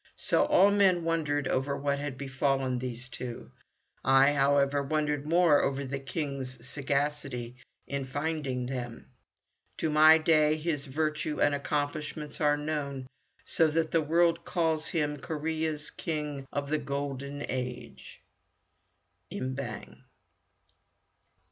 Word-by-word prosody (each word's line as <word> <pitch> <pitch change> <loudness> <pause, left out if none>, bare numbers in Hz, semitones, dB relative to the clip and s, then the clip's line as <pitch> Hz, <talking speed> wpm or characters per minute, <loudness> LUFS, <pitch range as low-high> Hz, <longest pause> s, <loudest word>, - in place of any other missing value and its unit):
So - - +2
all 195 +2 +5
men 190 -4 +4
wondered 150 -4 0
over 140 +2 0
what 140 0 -1
had 145 -2 -4
befallen 135 -1 0
these 125 0 -4
two. 120 - -7 0.5
I, 135 +1 +5
however, 140 0 +3
wondered 150 0 -1
more 165 -2 +5
over 140 0 -1
the 135 +1 -4
King's 135 -2 -5
sagacity 140 -3 -2 0.3
in 140 -1 -3
finding 145 -2 -2
them. 125 -2 -6 0.7
To 160 - -1
my 155 +1 +8
day 155 -1 +3
his 150 -3 -2
virtue 150 +1 -2
and 145 - +3
accomplishments 145 +1 -3
are 145 -1 +3
known, 145 -3 -3 0.4
so 165 - +3
that 160 +1 0
the 165 - +3
world 165 +2 +2
calls 160 -3 0
him 150 -3 -1
Korea's 155 0 -3
King 150 -4 -4
of 145 0 -3
the 155 - +2
Golden 140 0 -4
Age. 125 -1 -6 1.1
Im 130 0 -3
Bang. 110 - -7
145 Hz, 125 wpm, -29 LUFS, 135-155 Hz, 1.1 s, my